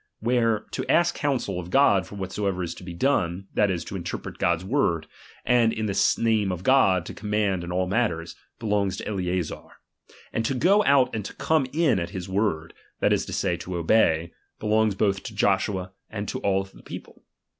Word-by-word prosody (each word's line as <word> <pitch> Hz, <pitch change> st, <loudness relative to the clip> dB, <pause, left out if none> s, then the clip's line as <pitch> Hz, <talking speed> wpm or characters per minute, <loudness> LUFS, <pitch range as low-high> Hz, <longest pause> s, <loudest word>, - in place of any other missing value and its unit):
Where 115 Hz, -1 st, +2 dB
to -, -, -3 dB
ask 175 Hz, 0 st, +4 dB
counsel 130 Hz, -, -1 dB
of 90 Hz, 0 st, -7 dB
God 100 Hz, -6 st, +4 dB
for -, -, -10 dB
what 95 Hz, -2 st, -5 dB
soever 100 Hz, -3 st, -1 dB
is 85 Hz, -, -4 dB
to -, -, -12 dB
be 90 Hz, -1 st, -7 dB
done, 95 Hz, -6 st, 0 dB
that 105 Hz, -, +3 dB
is, 90 Hz, -3 st, -2 dB
to -, -, -7 dB
interpret 85 Hz, -2 st, -5 dB
God's 85 Hz, +1 st, +1 dB
word, 90 Hz, -, +1 dB, 0.4 s
aud 120 Hz, -2 st, +4 dB
in 110 Hz, -, -2 dB
the 100 Hz, -2 st, +2 dB
name 110 Hz, -4 st, +2 dB
of 90 Hz, 0 st, -5 dB
God 95 Hz, -9 st, +4 dB
to -, -, -7 dB
command 105 Hz, -3 st, -1 dB
in 85 Hz, -, -6 dB
all 90 Hz, +1 st, +1 dB
matters, 90 Hz, -5 st, -1 dB, 0.2 s
belongs 105 Hz, -4 st, 0 dB
to -, -, -6 dB
Eleazar; 90 Hz, -4 st, -2 dB, 0.7 s
and 115 Hz, -, 0 dB
to 135 Hz, +4 st, -1 dB
go 195 Hz, +10 st, +4 dB
out 130 Hz, -3 st, +4 dB
and 110 Hz, -2 st, -2 dB
to -, -, -7 dB
come 155 Hz, -5 st, +1 dB
in 150 Hz, -, +2 dB
at 85 Hz, -, -3 dB
his 95 Hz, -3 st, -6 dB
word, 95 Hz, -5 st, -1 dB, 0.3 s
that -, -, +3 dB
is -, -, 0 dB
to -, -, -6 dB
say, 90 Hz, -3 st, 0 dB
to 90 Hz, +1 st, -6 dB
obey, 85 Hz, -2 st, +2 dB, 0.3 s
belongs 110 Hz, -1 st, +2 dB
both 100 Hz, -1 st, +1 dB
to 110 Hz, -, -8 dB
Joshua 95 Hz, -2 st, +1 dB, 0.2 s
and 105 Hz, -2 st, -5 dB
to -, -, -3 dB
all 95 Hz, -1 st, +1 dB
the 95 Hz, -, -16 dB
people. -, -, -10 dB
100 Hz, 200 wpm, -25 LUFS, 90-115 Hz, 0.7 s, ask